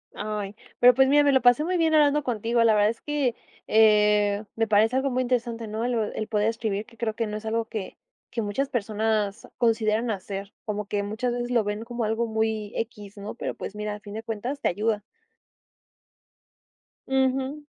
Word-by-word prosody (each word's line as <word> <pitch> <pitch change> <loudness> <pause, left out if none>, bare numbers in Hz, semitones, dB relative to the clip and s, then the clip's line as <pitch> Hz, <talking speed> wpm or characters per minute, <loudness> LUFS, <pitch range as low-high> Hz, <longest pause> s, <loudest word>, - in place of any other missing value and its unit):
Ay, 210 -1 -4 0.2
pero, 250 +1 +8
pues, 265 +2 +4
mira, 290 +2 +5
me 285 - +4
lo 265 -1 +4
pasé 245 +4 +5
muy 360 +3 0
bien 325 -2 +2
hablando 295 -1 +4
contigo, 235 -1 +1
la 225 -1 +5
verdad 210 0 +4
es 230 - -5
que, 285 -5 -1 0.3
eh, 210 -1 +4
me 225 0 +1
parece 220 +3 +3
algo 265 +1 +1
muy 255 +1 +1
interesante, 235 -2 -1
¿no? 215 +2 -3
El 245 +1 0 0.2
el 215 - -3
poder 210 -1 +1
escribir, 220 -2 -2
que 230 - -19
creo 225 -2 -1
que 230 -1 -1
no 210 0 -4
es 215 - -10
algo 225 +1 0
que 215 -4 -6 0.3
que 235 - -3
muchas 215 +7 -1
personas 215 -3 -1
consideran 225 0 +1
hacer, 195 0 -5
como 210 -1 -3
que 205 0 -1
muchas 220 +5 -2
veces 240 0 -3
lo 240 -3 +2
ven 205 +1 -3
como 240 0 -4
algo 225 +2 0
muy 220 -1 -1
equis, 210 -3 -5
¿no? 205 +2 -7
Pero - - -4
pues - - -6
mira, 210 0 -4
a - - -10
fin 205 -1 -10
de 220 - -4
cuentas 230 +5 -4
te - - 0
ayuda. 210 +3 0 2.1
Ujú. 265 +2 0
225 Hz, 200 wpm, -26 LUFS, 210-245 Hz, 2.1 s, pero